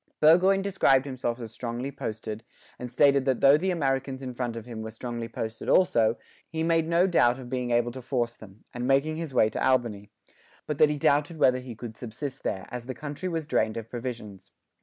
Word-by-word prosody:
Burgoyne 185 +5 +5
described 145 -9 +3
himself 125 -3 -3
as 115 -3 -7
strongly 120 +3 -4
posted, 110 -4 -5 0.4
and 125 - -5
stated 140 +1 +4
that 130 -3 +1
though 140 +1 +7
the 180 +5 0
Americans 135 -5 -1
in 130 -1 -5
front 120 -1 -3
of 115 -1 -7
him 115 -3 -7
were 110 - -5
strongly 115 +1 -5
posted 115 0 -5
also, 115 -11 +4 0.3
he 160 0 -2
made 165 -1 +2
no 170 +2 +3
doubt 125 -10 +3
of 125 -2 -10
being 125 -1 -2
able 120 0 +2
to 130 +2 -8
force 120 -2 -2
them, 105 -1 -15
and 125 0 -3
making 140 +4 +2
his 165 -3 -4
way 120 -4 +4
to 110 - -3
Albany; 120 -6 +1 0.6
but 150 -2 -4
that 155 - +6
he 150 - -1
doubted 145 +3 +2
whether 130 -4 +4
he 125 -2 -8
could 110 0 -8
subsist 130 +4 -6
there, 95 -1 -3
as 125 -1 -6
the 130 - -5
country 150 +5 -5
was 165 -3 -3
drained 110 -8 0
of 115 -1 -7
provisions. 115 -6 -7
125 Hz, 210 wpm, -27 LUFS, 115-145 Hz, 0.6 s, though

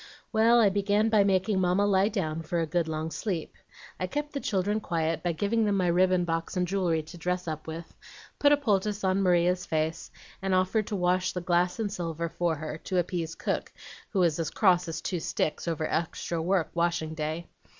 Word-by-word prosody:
Well, 230 +2 +5
I 215 -3 +6
began 205 +2 +2
by 215 -2 +5
making 195 0 +2
Mamma 185 +3 +2
lie 195 -1 +3
down 165 -7 -2
for 170 +1 -2
a 165 - +1
good 165 +1 0
long 160 0 -3
sleep. 180 -5 -3 0.5
I 185 - -1
kept 295 +9 -4
the 280 - -2
children 205 -2 0
quiet 165 -4 -1
by 175 - 0
giving 205 +7 +1
them 205 -1 +1
my 185 - +1
ribbon 180 +1 +3
box 165 +2 -2
and 180 0 +1
jewelry 175 -4 0
to 165 +3 -12
dress 180 +1 -2
up 155 -1 -5
with, 165 +1 -7 0.4
put 290 - +5
a 290 - +6
poultice 210 -6 0
on 190 +1 +2
Maria's 180 -1 +2
face, 160 +1 -1 0.3
and 190 -1 +1
offered 185 +3 +1
to 210 - -2
wash 180 0 +1
the 180 - -2
glass 175 +1 +1
and 210 -3 -2
silver 170 -3 -3
for 170 0 0
her, 155 +1 -6
to 185 - -1
appease 170 -2 -1
cook, - - -2 0.4
who 195 - +1
was 170 -2 +2
as 165 - -1
cross 180 -3 +3
as 165 -1 -4
two 180 - -2
sticks 155 +1 -2
over 160 -2 -1
extra 165 0 -2
work 180 0 +1
washing 170 -2 0
day. 160 +2 -3
180 Hz, 205 wpm, -28 LUFS, 165-195 Hz, 0.5 s, I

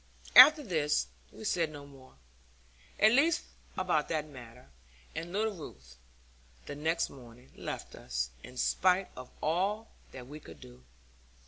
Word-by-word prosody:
After 295 +4 +10
this, 150 - 0 0.3
we - - -12
said 170 -6 0
no 145 -1 -10
more, 135 -2 -17 0.8
at 215 - +6
least 295 +7 +3 0.3
about 180 -5 0
that 155 -2 -1
matter; 125 - -13 0.4
and 165 +2 -6
little 215 +3 0
Ruth, 65 - -12 0.7
the - - -6
next 160 +3 -1
morning, 125 -1 -15
left - - -6
us, - - -4
in 125 - -12
spite 185 +7 +2
of 125 0 -9
all 195 +8 0 0.2
that 125 -2 -9
we 145 +4 -10
could - - -14
do. 60 0 -14
155 Hz, 140 wpm, -31 LUFS, 125-185 Hz, 0.8 s, After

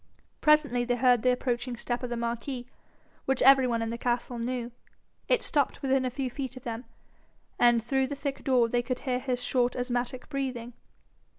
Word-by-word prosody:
Presently 300 -5 +4
they 245 0 0
heard 245 -1 +4
the 255 - +4
approaching 245 -1 -2
step 240 +1 -3
of 250 - -4
the 240 - -3
marquis, 235 +2 -3 0.6
which 270 -1 +1
every 270 0 +7
one 230 -2 0
in 225 - -3
the 235 - -5
castle 240 0 -1
knew. 240 0 -3 0.6
It - - +2
stopped 285 -3 0
within 265 -1 +2
a - - +1
few 260 +1 -3
feet 265 -1 -5
of 255 - -10
them, 235 +1 -5 0.7
and 240 -2 +5
through 265 +2 +1
the 285 - -4
thick 280 -1 -4
door 250 -3 +3
they 240 +1 +1
could 250 +1 -4
hear 250 -2 -1
his 250 -1 -2
short 250 -1 +1
asthmatic 245 0 -2
breathing. 255 -4 -4
250 Hz, 190 wpm, -28 LUFS, 240-265 Hz, 0.7 s, every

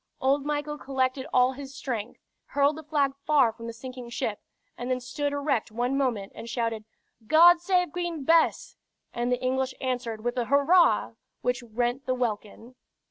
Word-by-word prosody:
Old 275 +2 +1
Michael 295 0 -2
collected 265 0 -1
all 250 0 +4
his 270 0 -9
strength, 235 -4 -4 0.3
hurled 285 +1 +2
the 315 - -7
flag 290 -3 0
far 280 -6 +4
from 230 0 -9
the - - -4
sinking 250 +1 -9
ship, 220 -3 -3 0.4
and 245 +1 -5
then 255 0 0
stood 285 +4 -3
erect 285 -6 -1
one 245 +4 -1
moment 240 -8 -1
and 230 - -9
shouted, 230 -2 -2 0.4
"God 340 +4 +7
save 360 -2 +1
Queen 345 -3 -3
Bess!" 325 +3 +2 0.4
and 240 +1 -1
the 250 - +1
English 260 +1 -1
answered 245 -4 -3
with 240 +1 -2
a 245 - 0
"Hurrah!" 285 +8 +4 0.3
which 250 0 0
rent 240 +3 -2
the 255 - +1
welkin. 230 0 -4
260 Hz, 170 wpm, -27 LUFS, 240-285 Hz, 0.4 s, God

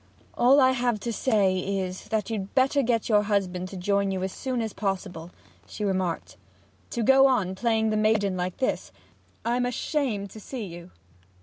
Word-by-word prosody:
'All 260 +4 +5
I 260 -1 +6
have 245 -3 0
to 235 +1 -3
say 200 -6 +2
is, 185 -1 -3
that 220 0 -2
you'd 200 -1 -4
better 270 +2 +3
get 235 -3 0
your 210 -2 +4
husband 190 -3 -1
to 195 - -8
join 200 +2 +1
you 190 -1 -2
as 190 - -2
soon 255 0 -3
as 220 - -4
possible,' 190 -4 -3 0.4
she 210 - -4
remarked. 185 -4 -2 0.5
'To 235 - -2
go 270 +3 +6
on 210 -9 +1
playing 220 +2 +1
the 215 - +1
maiden 215 -3 +2
like 180 0 -3
this 260 - -1 0.5
I'm 240 +2 +1
ashamed 245 -6 -2
to 220 - -10
see 240 +2 -6
you!' 175 -1 -10
210 Hz, 180 wpm, -26 LUFS, 190-240 Hz, 0.5 s, I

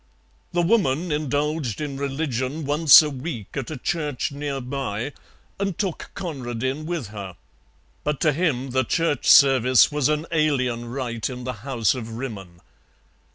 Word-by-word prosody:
The 175 -1 +1
Woman 170 -5 +1
indulged 150 -3 -1
in 145 -2 -4
religion 140 +1 -2
once 150 +1 +8
a 150 - -2
week 130 - -6
at 135 -4 -3
a 155 - -5
church 145 -1 -2
near 140 -1 -4
by, 130 -1 -4 0.5
and 195 -3 -2
took 190 -5 -3
Conradin 130 -2 -4
with 165 - -3
her, 100 -4 -8 0.7
but 150 -1 -1
to 155 -3 +3
him 135 -5 -1
the 130 +1 +2
church 165 +1 0
service 130 -2 +6
was 150 -1 +1
an 150 +1 0
alien 130 -7 +1
rite 120 -2 -3
in 125 -1 -7
the 130 0 -3
House 120 -5 +1
of 115 -3 -6
Rimmon. 100 -8 -7
135 Hz, 150 wpm, -23 LUFS, 125-155 Hz, 0.7 s, once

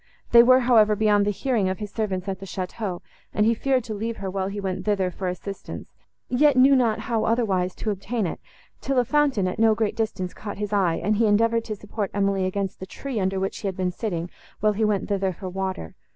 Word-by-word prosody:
They 235 - +9
were, 255 +2 +6
however, 220 -4 +5
beyond 205 -1 +3
the - - +3
hearing 210 -2 0
of 185 - -2
his 210 -2 -6
servants 195 -4 -2
at 190 -1 -3
the 195 - -9
château, 185 +1 -4 0.3
and 210 - +3
he 230 - +4
feared 260 +2 +1
to 225 -2 -5
leave 225 +2 -3
her 195 -1 -4
while 190 0 -2
he 200 +1 -5
went 190 -1 -3
thither 195 -3 0
for 185 +2 -4
assistance, 195 +2 -6 0.3
yet 280 +2 +3
knew 270 +2 +7
not 235 -4 +2
how 230 -3 -1
otherwise 195 -6 +1
to 215 - -2
obtain 205 +3 -2
it; 170 - -4 0.4
till 275 -1 -2
a 250 - +4
fountain 275 -9 +2
at 185 - -4
no 220 -1 +5
great 215 -1 -1
distance 200 -5 -2
caught 205 - -7
his 210 0 -3
eye, 185 -5 +2
and 210 +2 +1
he 225 0 +3
endeavoured 230 +2 +2
to 215 - -4
support 205 0 -4
Emily 195 -1 +1
against 195 0 -3
the 190 - -7
tree, 265 +2 -5
under 190 0 0
which 190 0 -1
she 205 - -5
had 190 -1 -4
been 185 -1 0
sitting, 175 -3 -4 0.3
while 215 0 +2
he 215 +2 -1
went 210 -2 +1
thither 195 -2 0
for 185 +2 -8
water. 190 - -4
205 Hz, 235 wpm, -24 LUFS, 190-225 Hz, 0.4 s, They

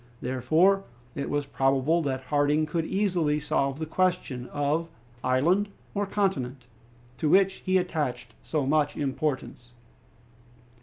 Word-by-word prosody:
Therefore 155 +11 +2 0.3
it 140 - -4
was 145 -1 -1
probable 135 +4 +2
that 130 -3 -2
Harding 145 +1 +3
could 160 +1 -2
easily 175 -7 +1
solve 140 -2 0
the 160 - -3
question 155 -7 -1
of 150 +3 -1 0.3
"island 170 +11 +2 0.2
or 205 -1 -1
continent," 140 - -1 0.5
to 155 - +1
which 195 +2 +4
he 185 0 +3
attached 145 -10 -2
so 150 -4 -1
much 145 +1 +1
importance. 135 -3 -3
150 Hz, 120 wpm, -27 LUFS, 135-175 Hz, 0.5 s, which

